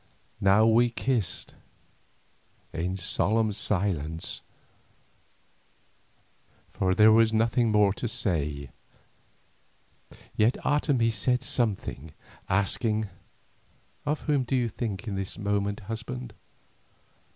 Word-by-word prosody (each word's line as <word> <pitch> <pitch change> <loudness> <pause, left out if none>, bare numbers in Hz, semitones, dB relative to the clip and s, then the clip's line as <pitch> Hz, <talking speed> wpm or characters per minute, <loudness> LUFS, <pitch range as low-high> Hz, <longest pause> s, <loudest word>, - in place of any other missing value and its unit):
Now 100 +3 +5
we 115 +2 +4
kissed 120 -5 -2 1.2
in 90 +3 -2
solemn 110 +4 +1
silence, 85 -6 -1 2.3
for 95 -1 +1
there 110 +2 +7
was 110 0 +5
nothing 115 +1 +2
more 105 -2 +4
to 120 - -4
say. 75 - -2 1.6
Yet 110 +4 +3
Otomie 135 -6 +2
said 125 +4 0
something, 100 - -2 0.4
asking: 105 +2 0 0.9
"Of 150 +1 -1
whom 145 -3 +1
do 130 +1 -1
you 120 -2 +1
think 105 -1 -5
in 105 - -3
this 95 -1 -4
moment, 100 0 -1
husband? 100 - -6
105 Hz, 95 wpm, -27 LUFS, 95-115 Hz, 2.3 s, there